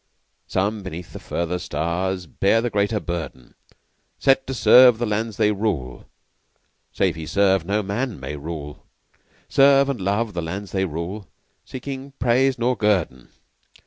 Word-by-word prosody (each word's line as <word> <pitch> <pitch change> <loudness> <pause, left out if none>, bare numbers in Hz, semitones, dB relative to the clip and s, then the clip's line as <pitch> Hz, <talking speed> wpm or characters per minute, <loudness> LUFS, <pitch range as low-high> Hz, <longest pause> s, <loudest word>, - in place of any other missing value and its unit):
Some 105 +3 -1
beneath 90 -2 -8
the - - -7
further 85 +1 -3
stars 90 +2 -2
Bear 100 +7 +1
the 120 +1 -2
greater 105 +1 +1
burden. 80 -9 -6 0.6
Set 135 -1 +2
to 135 - -3
serve 125 +1 +7
the 120 - -1
lands 110 0 -2
they 105 - +3
rule, 95 - -3 0.8
(Save 95 -4 0
he 80 -1 -7
serve 95 +1 +2
no 105 +3 0
man 105 - -3
may 65 +3 -6
rule) 75 -1 -8 0.6
Serve 140 0 +5
and 130 -7 -3
love 100 +3 -1
the 85 - -3
lands 95 +5 -6
they 95 -1 0
rule; 90 +5 -5 0.4
Seeking 135 +1 -7
praise 130 +2 +2
nor 120 +2 +1
guerdon. 95 - 0
100 Hz, 145 wpm, -22 LUFS, 85-115 Hz, 0.8 s, serve